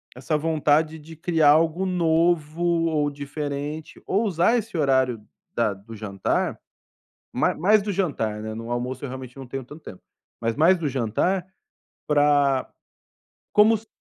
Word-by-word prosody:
essa 135 +5 -1
vontade 155 0 +1
de 160 +2 -12
criar 160 -2 +3
algo 165 +4 +2
novo 165 -2 +1
ou 165 -3 +1
diferente, 145 +1 -5
ou 205 +4 +1
usar 195 +4 +2
esse 225 -5 -4
horário 130 -6 +2 0.3
da 115 -3 +1
do 100 +4 -12
jantar, 100 -2 -2 0.7
ma - - +1
mais 210 +6 +4
do 205 - -3
jantar, 115 - -2
né, 110 0 -5
no 115 +1 -7
almoço 125 +2 -3
eu - - -3
realmente 130 0 -8
não 135 - -8
tenho 135 +1 -6
tanto 150 +6 -12
tempo, 90 - -11 0.4
mas 115 0 -1
mais 170 +5 +5
do 160 -3 -1
jantar 140 - 0 0.6
pra 145 -2 +3 0.8
como 220 +2 +6
se 220 +2 -17
150 Hz, 150 wpm, -24 LUFS, 130-170 Hz, 0.8 s, como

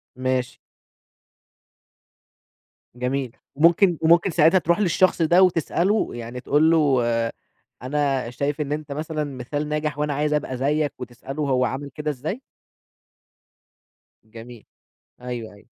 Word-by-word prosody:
ماشي. 130 0 -2 2.4
جميل، 125 0 -3 0.2
ممكن 170 +4 +4
وممكن 170 +3 +4
ساعتها 165 +3 +4
تروح 170 +2 +1
للشخص 185 -2 +2
ده، 170 +3 +4
وتسأله 180 +4 +1
يعني 120 +1 -7
تقول 150 +5 +3
له 145 -5 +3
آآ 115 -1 0 0.5
"أنا 135 -2 -1
شايف 140 +4 -2
إن 145 -1 -3
أنت 150 -1 -4
مثلًا 155 +1 -3
مثال 145 +2 -4
ناجح، 150 -1 -2
وأنا 150 0 0
عايز 150 +2 0
أبقى 140 -3 -2
زيك." 145 +2 0
وتسأله 125 +4 -6
هو 130 -3 +1
عمل 140 +2 -4
كده 150 0 -2
إزاي؟ 155 - -5 1.8
جميل، 115 +1 -12 0.6
أيوه، 120 -3 -6
أيوه. 100 +1 -19
145 Hz, 120 wpm, -23 LUFS, 125-155 Hz, 2.4 s, ممكن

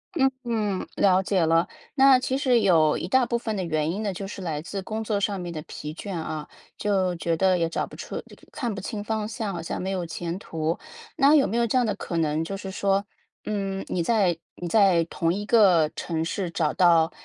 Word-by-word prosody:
嗯 270 -3 +4
嗯， 215 -5 -1
了 190 -1 +4
解 185 -3 +1
了。 165 +2 +3 0.3
那 270 -1 +7
其 260 +1 -1
实 250 -4 +3
有 160 -6 +4
一 - - -4
大 260 +6 +3
部 235 - -2
分 225 -2 -2
的 190 - -1
原 155 -2 0
因 205 +5 -3
呢 200 - -1
就 195 +2 -6
是 195 -1 -7
来 155 -3 -3
自 180 +4 -5
工 220 +1 -4
作 210 -2 0
上 200 -1 -1
面 175 -1 -5
的 160 - -5
疲 150 - -7
倦 185 +4 -6
啊， 155 -2 -4 0.3
就 190 -3 +1
觉 165 0 -1
得 185 +2 +3
也 165 -1 +1
找 165 - -2
不 - - -12
出 - - -6
就 - - -9 0.2
看 240 -7 -3
不 - - -5
清 205 +1 -5
方 215 0 -2
向， 220 -2 -4
好 - - -4
像 165 - -4
没 190 - -3
有 185 -3 -2
前 170 +1 -4
途。 165 -2 -3 0.4
那 280 +2 +5
有 290 -3 +5
没 225 - -1
有 235 - +3
这 230 - -2
样 245 - +3
的 - - -1
可 170 - -6
能 155 0 +1
就 195 +4 -4
是 195 0 -6
说， 195 +1 +1 0.4
嗯， 195 -2 -2
你 175 - -1
在 190 -4 +2 0.2
你 175 - -6
在 190 -3 +4
同 165 0 -1
一 205 +2 -4
个 185 -10 +5
城 165 -1 -2
市 175 +1 -3
找 160 -3 0
到， 170 -2 +4
190 Hz, 250 characters per minute, -25 LUFS, 170-215 Hz, 0.4 s, 那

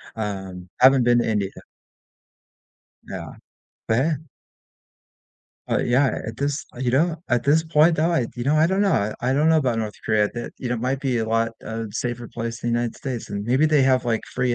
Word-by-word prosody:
Um, 95 -4 -5
haven't 130 -1 +7
been 120 0 +4
to - - 0
India. 100 -3 0 1.5
Yeah. - - -7 0.6
But, 110 - +3
hey 155 +6 +2 1.5
Oh, - - +1
yeah, 130 +2 +2
at 115 0 -6
this 140 +1 -2
Oh, - - -11
you 125 -2 0
know, 160 +6 +2
at 120 -1 +2
this 155 +3 +4
point 160 +1 +4
though, 160 +3 +2
I 130 -9 +1
you 120 - -3
know, 145 +2 +2
I 155 +1 +4
don't 190 +3 +1
know. 110 - +1
I 130 +2 +1
don't 150 +3 +3
know 160 - +5
about 125 -6 +1
North 105 -1 -3
Korea 105 -1 +2
that 120 - -5
you 125 - -4
know, 120 - 0
might 130 +4 -2
be 130 -3 0
a 110 -1 -1
lot, 115 0 +1
uh, 115 0 -4
safer 120 +1 -4
place 115 0 -5
in 120 - -1
United 120 0 -1
States, 125 -4 -5
and 100 0 -4
maybe 130 +6 +2
they 150 -2 +4
have, 130 -1 +3
like, 115 -2 0
free 125 -1 +1
120 Hz, 205 wpm, -23 LUFS, 115-140 Hz, 1.5 s, haven't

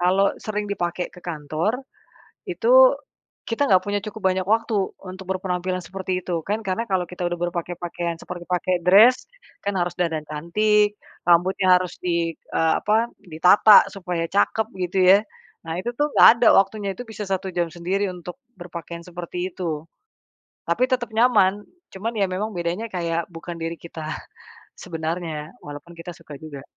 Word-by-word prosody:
Kalau 190 +3 +3 0.2
sering 210 -1 -2
dipakai 175 -2 -2
ke - - -13
kantor, 165 - -2 0.7
itu - - +6 0.5
kita 230 +5 -1
nggak 185 -1 +5
punya 205 0 -1
cukup 215 0 -8
banyak 185 0 -2
waktu, 225 +2 +1 0.3
untuk 185 +1 -8
berpenampilan 185 -1 -2
seperti 185 -1 -3
itu. 175 -2 -2
Kan 210 +2 -1
karena 195 +5 -1
kalau 190 -1 +2
kita 180 0 -5
udah 175 - -4
berpakai-pakaian 175 0 -4
seperti 175 -1 -8
pakai 180 0 0
dress, 220 +7 +6 0.4
kan 200 0 -2
harus 175 0 -1
dandan 165 -3 0
cantik, 210 +7 +1 0.3
rambutnya 180 +2 +4
harus 180 - -6
di 170 -2 0
eee, 160 0 0
apa, 220 +3 +1
ditata 180 +4 +6
supaya 180 -4 -3
cakep, 215 - +1 0.2
gitu 190 +2 -2 0.2
ya. - - +6 0.5
Nah, 165 +1 -3
itu 240 - -2
tuh 295 0 +1
nggak - - +9
ada - - +7
waktunya. 200 +1 0
Itu - - -6
bisa 220 -1 -7
1 190 0 -2
jam 175 -1 +1
sendiri 185 +4 -1
untuk 180 +3 -9 0.2
berpakaian 170 -1 -8
seperti 175 +1 -5
itu. 160 -5 -3 0.9
Tapi 220 +10 +2
tetap 245 -2 0
nyaman. 215 -4 +3 0.3
Cuman 220 +5 -4
ya 205 - +2
memang 190 +4 -2
bedanya 175 +4 -3
kayak 170 -2 -2
bukan 170 +1 -7
diri 165 +1 -3
kita 165 -2 -8 0.7
sebenarnya, 160 -1 -4
walaupun 145 +4 -9
kita 165 +1 -8
suka 165 -3 -13
juga. 145 -3 -9
180 Hz, 155 wpm, -23 LUFS, 170-205 Hz, 0.9 s, nggak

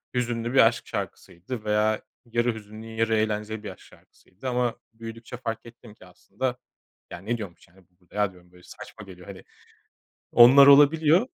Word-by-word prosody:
hüzünlü 120 -1 -2
bir 135 - +4
aşk 115 0 -3
şarkısıydı 105 +7 -7
veya 105 0 +1 0.2
yarı 120 0 0
hüzünlü, 110 +1 -11
yarı 115 0 0
eğlenceli 110 0 -2
bir 105 - -6
aşk - - -15
şarkısıydı 105 +8 -12
ama 125 -2 0 0.2
büyüdükçe 115 +1 -9
fark 115 -2 -5
ettim 115 -2 -14
ki 100 - -18
aslında 105 +7 -5 0.5
ya - - -7
ne 110 +6 -3
diyormuş, 95 -6 -10
yani, 90 +1 -24
bu 90 - -40
burada 90 0 -22
ya 105 -2 +1
diyorum 90 -1 -21
böyle 90 0 -20
saçma 105 - -12
geliyor 90 -2 -14
hani. 95 -2 -10 0.9
Onlar 130 +4 +8
olabiliyor. 150 - +6
110 Hz, 170 wpm, -25 LUFS, 100-120 Hz, 0.9 s, Onlar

